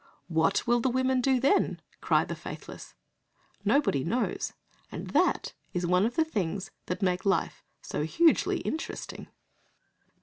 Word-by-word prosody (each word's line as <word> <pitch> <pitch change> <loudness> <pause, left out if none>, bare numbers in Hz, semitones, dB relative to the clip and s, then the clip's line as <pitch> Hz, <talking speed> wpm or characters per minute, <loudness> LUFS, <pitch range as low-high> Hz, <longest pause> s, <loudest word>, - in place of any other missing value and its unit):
"What 160 +3 +2
will 240 0 +3
the 260 - +1
women 260 +1 +2
do 260 0 +3
then?" 280 +10 +2 0.2
cry - - +3
the - - -4
faithless. - - -9 0.7
Nobody 275 - +2
knows, 235 +9 -1 0.4
and - - -6
that - - +2 0.2
is 180 0 -1
one 180 +4 +3
of 240 - -6
the 320 - +3
things 195 - -3 0.2
that 180 +3 -3
make 180 -1 +1
life 190 -4 0 0.2
so - - -3
hugely 320 - +3
interesting. 320 - -5
220 Hz, 140 wpm, -29 LUFS, 180-260 Hz, 0.7 s, will